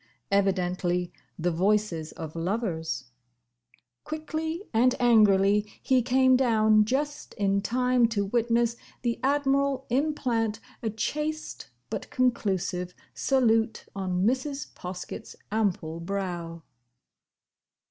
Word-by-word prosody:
Evidently 180 -2 +1 0.2
the 175 +1 0
voices 180 -2 +1
of 160 -1 -7
lovers. 165 - -2 0.9
Quickly 315 +3 -4
and 245 +3 +4
angrily 210 -3 +4
he 260 -2 +3
came 260 +1 +4
down, 220 -4 +4
just 290 +5 -2
in 200 -1 +1
time 250 +2 +2
to 205 -3 -1
witness 235 +2 +1 0.3
the 235 -1 0
Admiral 275 -1 +1
implant 245 -6 0 0.2
a 225 - -1
chaste 300 +8 -3 0.2
but - - -4
conclusive 190 -7 0 0.2
salute 225 -4 +2
on 185 -1 -1
Mrs. 270 +4 -1
Poskett's 180 0 -7 0.2
ample 180 -7 -1
brow. 170 -3 -4
220 Hz, 95 wpm, -27 LUFS, 185-255 Hz, 0.9 s, and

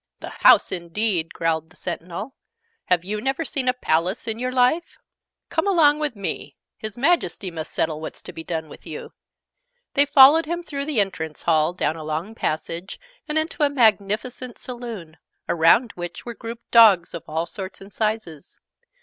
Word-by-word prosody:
"The - - -7
house, - - +5
indeed!" 175 0 -1
growled 160 -1 -1
the 175 - -21
Sentinel. 180 +7 -6 0.5
"Have 180 -2 +1
you 210 +2 -3
never 270 +6 -1
seen 270 -4 -2
a 250 - +4
Palace 185 -1 -1
in 225 0 -2
your 250 +1 -2
life? 255 +7 +1 0.5
Come - - 0
along 310 -6 +4
with 300 -5 -2
me! 165 -7 -5 0.2
His 215 0 -7
Majesty 275 - +1
must 160 -2 -6
settle 155 -1 -1
what's 160 - -7
to - - -9
be 160 - -8
done 160 -1 -4
with - - -13
you." - - -8 0.8
They 285 +1 +4
followed 285 +3 +7
him 345 +1 -3
through 280 -3 -4
the 295 -6 0
entrance 160 -6 -2
hall, 160 0 +2
down 165 -3 -1
a 160 - -7
long 155 +7 -4
passage, 170 -1 -4 0.3
and 305 0 -1
into 315 0 -2
a 290 - +5
magnificent 235 0 +1
Saloon, 230 -10 -8 0.3
around 175 +9 +4
which 175 -1 -7
were 240 - -5
grouped 230 +1 -9
dogs 210 -7 +6
of 170 - -5
all 160 +2 -2
sorts 190 +1 -8
and 195 0 -13
sizes. 215 -9 -3
210 Hz, 175 wpm, -23 LUFS, 165-255 Hz, 0.8 s, followed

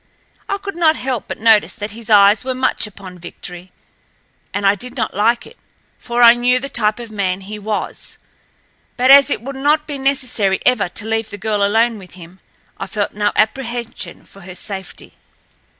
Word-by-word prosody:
I 400 - 0
could 395 -1 -7
not 325 -2 +4
help 255 -5 -3
but - - -5
notice 220 -1 +4
that 205 0 -5
his 230 +1 -8
eyes 205 0 +6
were 260 0 -3
much 255 -3 0
upon 190 -3 -12
Victory, 180 +1 -9 0.8
and 205 0 -2
I 195 - +5
did 250 +6 -4
not - - -2
like 230 +4 +1
it, 480 - -16 0.4
for 240 0 0
I 235 0 +10
knew 245 +1 +2
the 275 +2 -5
type 215 -4 +1
of 235 -2 -9
man 195 -3 -2
he 210 +2 -8
was. 210 +1 -4 0.8
But 255 +1 +4
as 280 +1 +8
it 260 - -2
would 275 +2 -6
not 295 +3 +1
be 290 -3 -6
necessary 255 -8 +1
ever 225 -7 +3
to 210 - -3
leave 225 0 -1
the 205 - -8
girl 210 0 -1
alone 225 +2 +2
with 180 -2 -14
him 180 +1 -13 0.4
I - - -4
felt 205 -2 -2
no 205 0 0
apprehension 235 +1 -2
for 195 - -16
her 180 0 -10
safety. 190 0 -6
220 Hz, 190 wpm, -18 LUFS, 200-250 Hz, 0.8 s, I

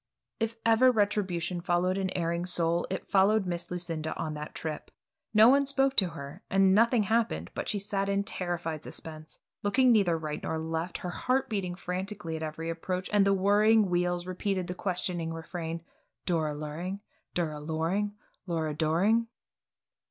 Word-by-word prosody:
If 225 0 -1
ever 230 +3 +6
retribution 195 -5 0
followed 175 +1 +1
an 190 -1 -1
erring 170 +1 -1
soul, 170 -1 +1
it - - -4
followed 200 +1 +4
Miss 175 -1 -3
Lucinda 165 -3 -3
on 160 -2 -3
that 150 0 -7
trip. 155 -2 -5 0.4
No 215 +1 +7
one 280 +2 +5
spoke 270 -1 +2
to 190 - +5
her, 140 +4 -9
and 195 -1 +4
nothing 230 +2 +4
happened, 205 - 0
but - - -3
she 210 - +1
sat 200 0 -1
in 200 0 +1
terrified 175 -5 -3
suspense, 155 -1 -7 0.2
looking 250 +5 +4
neither 200 -7 +4
to - - +1
right 155 -2 -4
nor 160 - -2
left, 160 +2 -3
her 180 - -5
heart 255 +7 0
beating 185 -4 -2
frantically 185 -1 -4
at 160 - -5
every 160 +1 -4
approach, 180 +2 -3
and 200 -1 +5
the 195 - +4
whirring 205 +1 +4
wheels 175 0 0
repeating 185 0 -2
the 180 - -4
questioning 180 -3 -2
refrain, 165 0 -5 0.4
"Dora 160 -4 0
Luring? 165 +7 -5 0.3
Dura 155 -4 -1
Loring? 165 +7 -1 0.3
Lura 160 -3 -1
Doring?" 180 +10 +2
180 Hz, 165 wpm, -29 LUFS, 165-205 Hz, 0.4 s, No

